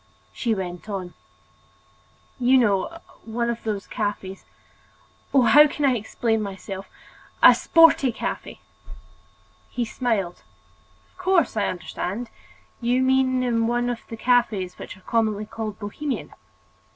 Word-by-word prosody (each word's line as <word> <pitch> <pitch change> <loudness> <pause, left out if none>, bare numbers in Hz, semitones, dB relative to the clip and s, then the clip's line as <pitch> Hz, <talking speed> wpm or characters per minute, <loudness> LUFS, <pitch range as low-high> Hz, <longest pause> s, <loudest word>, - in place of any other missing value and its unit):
She 230 -3 -1
went 180 +1 -6
on: 185 -3 -5 1.3
"You 255 +1 +5
know, 210 - +1 0.3
one 235 +1 -2
of 235 - -6
those 210 -3 -3
cafes—oh, 205 +5 -4
how 295 +6 +7
can 290 0 -2
I 260 -2 +3
explain 225 0 -1
myself?—a 195 -1 0
sporty 330 -6 +5
cafe!" - - -5 1.1
He 245 -2 -2
smiled: 215 -6 -2 0.7
"Of - - -31
course, 365 -9 +2
I 205 -2 +1
understand—you 235 +6 -4
mean 260 -1 +2
in 230 -2 +1
one 240 +1 0
of 235 - -5
the 225 - -6
cafes 220 -7 +1
which - - -8
are - - -20
commonly 215 -1 0
called 215 -1 -6
bohemian." 255 +7 -5
230 Hz, 115 wpm, -24 LUFS, 205-250 Hz, 1.3 s, how